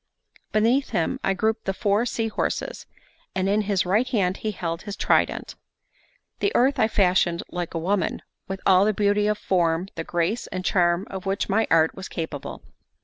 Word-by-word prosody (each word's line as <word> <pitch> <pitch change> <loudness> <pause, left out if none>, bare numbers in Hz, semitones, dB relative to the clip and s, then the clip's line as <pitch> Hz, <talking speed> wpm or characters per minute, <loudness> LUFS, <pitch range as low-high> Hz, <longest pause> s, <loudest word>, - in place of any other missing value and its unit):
Beneath 235 +6 +2
him 175 +10 -1
I 195 - +1
grouped 220 +3 -1
the 195 - -1
four 210 +3 +1
sea 225 -1 -1
horses, 220 - -3 0.5
and 190 0 0
in 205 +2 +2
his 195 -3 +2
right 210 +8 +2
hand 195 -7 0
he 215 - -3
held 170 -4 -4
his 205 -2 -6
trident. - - +1 0.9
The 405 - +1
earth 265 +3 +3
I 220 - +4
fashioned 180 -4 +2
like 175 -1 -4
a - - +1
woman, 185 +4 -1 0.2
with 195 -1 -5
all 190 0 +6
the 215 -1 +1
beauty 205 0 +2
of 210 0 +1
form, 175 -2 0
the 165 - -4
grace, 175 +8 -1
and 185 0 -5
charm 175 0 +2
of 190 0 -6
which 195 +2 -1
my 220 +3 +2
art 160 0 +4
was 190 - -8
capable. 160 -5 -6
195 Hz, 185 wpm, -24 LUFS, 180-215 Hz, 0.9 s, all